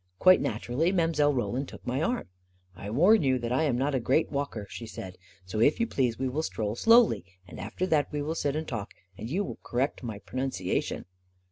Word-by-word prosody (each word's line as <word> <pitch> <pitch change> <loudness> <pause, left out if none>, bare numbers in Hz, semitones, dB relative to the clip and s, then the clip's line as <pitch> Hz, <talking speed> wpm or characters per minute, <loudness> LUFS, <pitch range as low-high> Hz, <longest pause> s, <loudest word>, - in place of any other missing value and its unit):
Quite 185 - +6
naturally 125 - 0
Mile. 165 -5 +2
Roland 130 0 -1
took - - -12
my 130 +4 -1
arm. 240 +9 -1 0.5
44 95 +3 -8
1 110 - -4
warn 205 +8 +6
you 130 -3 +2
that 120 -1 -4
I 130 +6 +2
am 130 -5 +1
not 140 +3 0
a 130 - +2
great 130 +7 +1
walker," 140 -7 -3
she 115 - -8
said; 95 -4 -8 0.2
" 95 -1 -28
so 95 +4 -4
if 145 +7 +4
you 230 - +3
please, 125 - 0
we 130 - -1
will 135 +5 -1
stroll 110 -8 -3
slowly; 230 - +5 0.2
and - - -10
after 110 - -3
that 155 -5 +1
we 145 -1 -2
will 155 +2 -2
sit 145 -3 -1
and 155 +1 -3
talk, 110 -5 -5 0.2
and 110 +4 -7
you 185 +8 0
will - - -7
correct 130 +4 -1
my 115 -5 -5
pronunciation." 130 -5 -3
135 Hz, 225 wpm, -28 LUFS, 115-155 Hz, 0.5 s, Quite